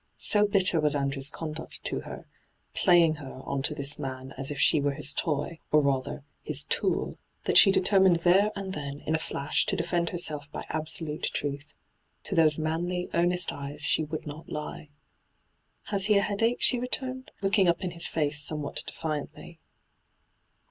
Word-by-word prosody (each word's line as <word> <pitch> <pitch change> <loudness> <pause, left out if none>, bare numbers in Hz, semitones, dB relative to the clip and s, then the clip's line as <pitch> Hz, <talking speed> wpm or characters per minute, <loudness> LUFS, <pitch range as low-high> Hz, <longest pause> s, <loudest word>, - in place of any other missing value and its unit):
So 210 0 +5
bitter 190 -4 +3
was 150 -1 +2
Andrew's 140 0 -1
conduct 160 0 -7
to - - -2
her - - -9 0.2
— - - -43
' - - -45
playing 170 -4 +5
her 135 -3 -10
' - - -17
on 140 -1 -2
to 150 +2 0
this 140 0 +1
man 130 0 -6
as 135 +1 -4
if 145 - -5
she 150 - +4
were 140 -1 -1
his 150 0 +1
toy, 155 +1 -2
or, 150 - +5
rather, 140 0 -2 0.2
his - - 0
tool - - -1 0.2
— - - -45
that - - 0
she 195 - +7
determined 190 -2 +4
there 190 +4 +4
and 195 -1 -5
then, 140 -2 -6
in 155 - -3
a 160 - +1
flash, 145 -2 -1
to - - 0
defend 170 0 -1
herself 150 -4 0
by - - -7
absolute 155 0 -2
truth. 145 +1 -5 0.5
To - - -4
those 160 -4 +5
manly, 175 +3 -2
earnest 175 +1 +2
eyes 145 +1 -7
she 155 - +3
would 155 0 -6
not 150 +1 -9
He. 150 0 -7 0.5
' - - -46
Has 195 -2 +5
he 210 0 +4
a 200 - +2
headache 225 +4 0
V - - -1
she 250 - +4
returned, 260 +1 -4
looking 195 -1 +3
up 170 +2 +1
in 180 - -3
his 170 0 0
face 150 -2 0
somewhat 150 -1 -1
defiantly. 160 +2 -6
155 Hz, 190 wpm, -27 LUFS, 145-180 Hz, 0.5 s, she